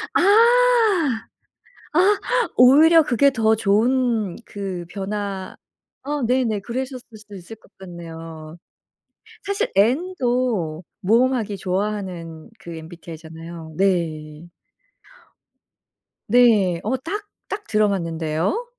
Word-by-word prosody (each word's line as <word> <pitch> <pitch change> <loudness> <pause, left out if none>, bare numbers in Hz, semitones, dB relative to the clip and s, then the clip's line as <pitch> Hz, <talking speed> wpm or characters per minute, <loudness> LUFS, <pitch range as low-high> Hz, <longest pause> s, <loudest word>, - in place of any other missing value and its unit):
아. - - +4 1.7
아. 380 +6 +4 0.4
오히려 310 +6 +7
그게 280 +1 +3
더 220 -3 +2
좋은 220 -1 +1
그 190 -4 -6
변화 200 -1 -5 0.5
어 290 0 -3
네네. 240 -3 +1
그러셨을 255 +3 -5
수도 210 -1 -13
있을 190 +4 -10
것 220 - -24
같네요. 165 -3 -10 0.9
사실 405 +4 -1
N도 245 - 0 0.2
모험하기 225 0 +1
좋아하는 185 -4 -4
그 170 -1 -9
MBTI 165 0 -10
잖아요. 165 0 -10
네. 165 -4 -1 1.8
네. 210 -7 +4
어 225 +5 0
딱, 405 +10 -6 0.2
딱 415 +1 -5
들어맞는데요? 180 - -1
205 Hz, 190 characters per minute, -21 LUFS, 170-255 Hz, 1.8 s, 오히려